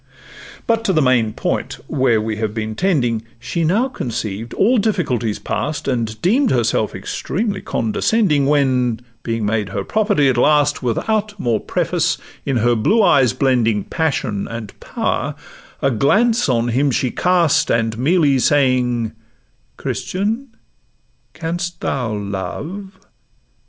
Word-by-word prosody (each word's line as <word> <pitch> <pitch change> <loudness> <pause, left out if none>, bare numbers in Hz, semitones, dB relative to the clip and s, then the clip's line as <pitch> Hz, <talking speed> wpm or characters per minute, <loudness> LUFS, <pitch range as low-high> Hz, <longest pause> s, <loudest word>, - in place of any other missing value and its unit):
But 230 -1 +1
to 190 - +2
the 155 - +3
main 125 -4 +3
point, - - -3
where 130 -4 +2
we 110 0 -3
have 110 -1 -3
been 110 -1 -3
tending:— 120 - +1 0.2
She 165 +8 -3
now 205 +11 +2
conceived 115 - -4
all 235 +4 +3
difficulties 130 - 0
past, 150 -2 -3
And 115 -4 -2
deem'd 240 +9 +3
herself 120 -3 +1
extremely 200 0 -3
condescending 145 - +1
When, 130 -5 +2 0.2
being 115 -2 -2
made 105 -2 0
her - - -3
property 205 -9 +2
at 130 -2 +2
last, 145 +2 +3
Without 205 - -1
more 115 -7 +1
preface, - - 0 0.3
in 135 -3 +1
her 120 +1 +3
blue 205 - +3
eyes 130 - +4
blending 115 -6 +1
Passion 135 -11 -2
and 115 -3 -7
power, - - -2 0.5
a 135 - +3
glance 215 - +2
on 120 -1 +1
him 135 +5 +2
she 130 -1 0
cast, 180 -4 +2
And 115 -1 +1
merely 145 -1 +3
saying, 125 -4 +2 0.7
'Christian, 215 +8 -2 0.9
canst 170 +1 -4
thou 125 -5 -2
love? 105 - -5
130 Hz, 130 wpm, -19 LUFS, 115-180 Hz, 0.9 s, eyes